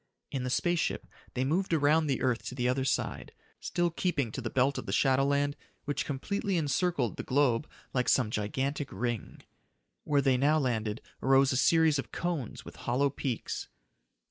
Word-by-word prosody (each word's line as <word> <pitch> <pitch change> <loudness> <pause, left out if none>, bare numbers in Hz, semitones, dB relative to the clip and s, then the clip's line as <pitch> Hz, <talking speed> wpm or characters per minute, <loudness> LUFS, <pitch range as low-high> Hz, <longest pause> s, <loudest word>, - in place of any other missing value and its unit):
In 130 -2 -2
the 125 - -2
space 175 +7 +1
ship, - - -1 0.3
they 125 - +1
moved 175 +6 0
around 155 +1 +3
the 135 -1 0
earth 125 -3 +1
to 130 - -5
the 125 -1 0
other 130 +1 +1
side, - - -2 0.3
still 175 -1 0
keeping 160 - -1
to 130 - -5
the 115 - -3
belt 130 +3 +2
of - - -5
shadowland 140 +1 +2 0.3
which 145 - -1
completely 190 +7 -1
encircled 145 - 0
the - - -2
globe 130 -1 +2 0.2
like 125 -1 +1
some 120 -5 +3
gigantic 135 +7 -2
ring. 120 +2 -4 0.6
Where 145 -1 +2
they 130 -2 +3
now 145 +4 +3
landed 115 -6 -1 0.2
arose 135 +1 +4
a - - 0
series 160 0 +4
of - - -6
cones 170 -9 -3
with - - -11
hollow 135 +3 +1
peaks. 130 -3 -3
135 Hz, 170 wpm, -30 LUFS, 125-150 Hz, 0.6 s, arose